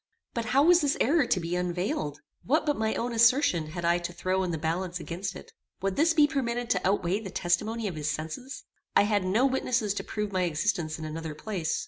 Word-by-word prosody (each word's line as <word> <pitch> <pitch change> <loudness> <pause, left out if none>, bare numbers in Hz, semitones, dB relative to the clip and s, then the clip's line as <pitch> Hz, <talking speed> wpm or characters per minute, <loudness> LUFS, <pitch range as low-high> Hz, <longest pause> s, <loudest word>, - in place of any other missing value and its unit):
But 235 -1 -2
how 270 +4 +3
was 345 +2 +6
this 290 -1 +1
error 285 0 +3
to 185 - +2
be 170 +1 -3
unveiled? 175 -4 -2 0.2
What 305 +6 +1
but 295 -1 +1
my 220 0 -1
own 240 0 -2
assertion 230 - +4
had 170 +2 -5
I 170 +1 +3
to 175 0 -5
throw 185 +2 -1
in 185 - -1
the 165 - -2
balance 170 +3 -2
against 175 +3 -5
it? - - -11 0.3
Would 195 -1 0
this 325 +2 +3
be 300 -2 +7
permitted 245 -5 -2
to 185 -1 +1
outweigh 195 0 +1
the 210 -3 -7
testimony 215 +6 -1
of 190 - -3
his 155 -1 -3
senses? 160 - -5 0.3
I - - +6
had 205 -2 +1
no 205 +8 +2
witnesses 250 -5 +1
to - - -4
prove 210 -1 -3
my 185 -1 0
existence 155 -1 -1
in 160 - -6
another 155 0 -5
place. 175 -3 -2
190 Hz, 220 wpm, -28 LUFS, 170-240 Hz, 0.3 s, be